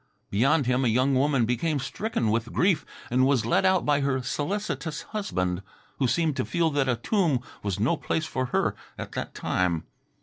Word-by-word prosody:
Beyond 135 Hz, +8 st, +3 dB
him 125 Hz, +1 st, +2 dB
a -, -, +3 dB
young 130 Hz, +4 st, +3 dB
woman 135 Hz, -2 st, +3 dB
became 135 Hz, +7 st, 0 dB
stricken 135 Hz, -, -1 dB
with 115 Hz, +1 st, -1 dB
grief 180 Hz, -4 st, +2 dB, 0.2 s
and 130 Hz, +2 st, +4 dB
was 130 Hz, -5 st, +2 dB
led 155 Hz, +10 st, +3 dB
out 185 Hz, -1 st, +2 dB
by 145 Hz, -1 st, +3 dB
her 135 Hz, -2 st, 0 dB
solicitous 155 Hz, 0 st, -3 dB
husband, 90 Hz, -, -2 dB, 0.4 s
who 130 Hz, -, +3 dB
seemed 160 Hz, +2 st, +1 dB
to -, -, +1 dB
feel 170 Hz, -2 st, +1 dB
that 140 Hz, -2 st, +1 dB
a 125 Hz, -, +3 dB
tomb 170 Hz, -, +1 dB, 0.2 s
was 100 Hz, -2 st, -2 dB
no 120 Hz, +11 st, +2 dB
place 160 Hz, -, -1 dB
for 130 Hz, -4 st, -2 dB
her -, -, 0 dB, 0.2 s
at -, -, -6 dB
that -, -, -5 dB
time. 85 Hz, -3 st, 0 dB
135 Hz, 190 wpm, -26 LUFS, 120-160 Hz, 0.4 s, and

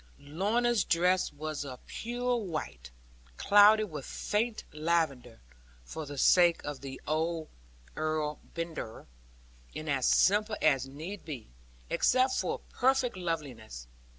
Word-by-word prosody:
Lorna's 205 Hz, +10 st, +1 dB
dress 180 Hz, +2 st, +2 dB
was 155 Hz, 0 st, -5 dB
of 130 Hz, -3 st, -9 dB
pure 245 Hz, +2 st, -2 dB
white, 155 Hz, -, -5 dB, 0.5 s
clouded 205 Hz, 0 st, +6 dB
with 150 Hz, -3 st, -6 dB
faint 215 Hz, -, -2 dB
lavender 150 Hz, -7 st, -1 dB, 0.4 s
(for 155 Hz, -, -7 dB
the 145 Hz, 0 st, -7 dB
sake 175 Hz, +4 st, +5 dB
of 145 Hz, -2 st, -6 dB
the 135 Hz, -1 st, -7 dB
old 160 Hz, +1 st, -1 dB, 0.5 s
Earl 155 Hz, -1 st, -1 dB, 0.2 s
Brandir), 165 Hz, -9 st, -5 dB, 0.7 s
and 155 Hz, -, -6 dB
as 135 Hz, -3 st, +1 dB
simple 210 Hz, +3 st, +3 dB
as 135 Hz, -4 st, +2 dB
need 160 Hz, +9 st, -7 dB
be, 135 Hz, -, -8 dB, 0.4 s
except 255 Hz, +1 st, +3 dB
for -, -, -1 dB
perfect 260 Hz, -2 st, +2 dB
loveliness. 140 Hz, -, -5 dB
160 Hz, 120 wpm, -30 LUFS, 145-205 Hz, 0.7 s, clouded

